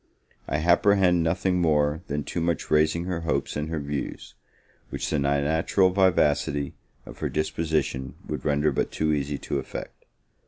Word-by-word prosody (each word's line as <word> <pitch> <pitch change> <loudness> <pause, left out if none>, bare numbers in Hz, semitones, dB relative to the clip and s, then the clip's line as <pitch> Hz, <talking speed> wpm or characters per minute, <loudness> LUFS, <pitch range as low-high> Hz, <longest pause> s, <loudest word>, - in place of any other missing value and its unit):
I 70 - -1
apprehend 90 +2 +4
nothing 90 +2 +1
more 75 -1 +2
than 75 0 -2
too 85 - -3
much 85 -1 -1
raising 80 +2 +3
her 90 -2 -2
hopes 80 -1 -2
and 75 +1 -3
her 80 -1 -2
views, 70 -1 -5 0.6
which - - -3
the 75 - +1
natural 80 +7 +2
vivacity 75 -6 +2 0.3
of - - -11
her - - -1
disposition 75 -4 -1
would - - -4
render 75 0 +2
but 65 - -1
too 80 -1 0
easy 70 0 -1
to - - -3
effect. - - -8
80 Hz, 155 wpm, -26 LUFS, 75-85 Hz, 0.6 s, apprehend